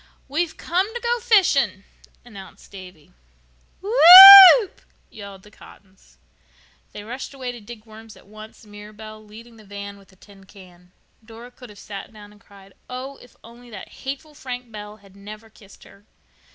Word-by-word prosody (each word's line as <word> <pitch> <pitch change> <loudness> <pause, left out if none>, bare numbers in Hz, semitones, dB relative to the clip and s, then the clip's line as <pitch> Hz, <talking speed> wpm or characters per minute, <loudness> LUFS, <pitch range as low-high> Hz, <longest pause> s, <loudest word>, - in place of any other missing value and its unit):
"We've 315 +4 -6
come 370 +5 -5
to - - -7
go 475 0 -5
fishing," 385 - -2 0.4
announced 200 -5 -18
Davy. 180 - -17 0.7
"Whoop," 390 0 +7 0.3
yelled 200 -2 -15
the 210 - -21
Cottons. 190 - -23 0.7
They 205 - -13
rushed 250 +5 -12
away 255 -2 -9
to 240 -2 -15
dig 215 +1 -16
worms 220 0 -18
at - - -24
once, 215 +2 -18
Mirabel 215 +1 -16
leading 225 +2 -19
the 215 - -20
van 200 0 -13
with 195 -1 -25
a - - -27
tin 195 0 -23
can. 180 -2 -22 0.3
Dora 230 +2 -17
could 250 -1 -18
have 205 - -19
sat 200 +1 -13
down 210 -1 -18
and 210 -1 -25
cried. 195 -1 -22 0.2
Oh, 260 +2 -11
if 245 - -23
only 240 +1 -19
that 210 -4 -14
hateful 280 +3 -12
Frank 250 -4 -12
Bell 210 0 -14
had 195 -2 -25
never 215 +2 -16
kissed 200 -2 -22
her! 200 - -23
215 Hz, 165 wpm, -18 LUFS, 200-255 Hz, 0.7 s, Whoop